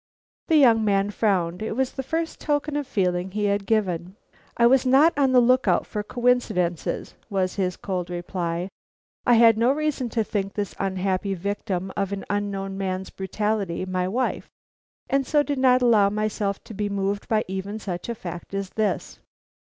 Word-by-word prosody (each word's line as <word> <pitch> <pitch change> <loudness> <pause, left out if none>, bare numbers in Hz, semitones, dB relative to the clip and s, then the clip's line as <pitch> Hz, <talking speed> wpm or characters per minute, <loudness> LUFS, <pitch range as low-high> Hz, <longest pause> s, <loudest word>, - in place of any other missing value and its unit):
The 325 - +3
young 235 -6 +5
man 200 -1 +1
frowned. 185 -4 0
It 220 - -2
was 260 +1 0
the 270 - -4
first 325 +5 -3
token 295 0 -1
of 290 -2 -2
feeling 185 -6 0
he 210 +2 -3
had 200 -1 0
given. 185 -4 0 0.4
"I 235 - +5
was 255 +1 +5
not 275 +6 +5
on 275 -2 +3
the 255 - +6
look 255 0 +3
out 175 - +3
for 210 - -4
coincidences," 210 -7 0 0.2
was 190 -3 0
his 185 -3 -1
cold 180 -3 -3
reply. 175 0 -3 0.6
"I 245 - +6
had 225 -1 +6
no 240 +3 +4
reason 290 -4 -1
to 225 0 0
think 200 -2 -3
this 205 -2 -3
unhappy 195 0 -1
victim 190 0 -3
of 195 -1 -1
an 200 -1 -4
unknown 195 -1 -2
man's 190 -1 -3
brutality 195 -2 -2
my 185 -1 -1
wife, 250 +7 -2 0.6
and 275 0 +1
so 295 -2 +3
did 285 -2 -2
not 255 -1 +4
allow 215 -5 +5
myself 210 -1 -2
to - - -10
be 205 0 -2
moved 200 0 -2
by 220 -1 +1
even 190 +3 -4
such 185 -2 -5
a 235 - -2
fact 175 -1 -7
as 195 -1 -3
this." 215 -1 -2
205 Hz, 180 wpm, -24 LUFS, 190-240 Hz, 0.6 s, the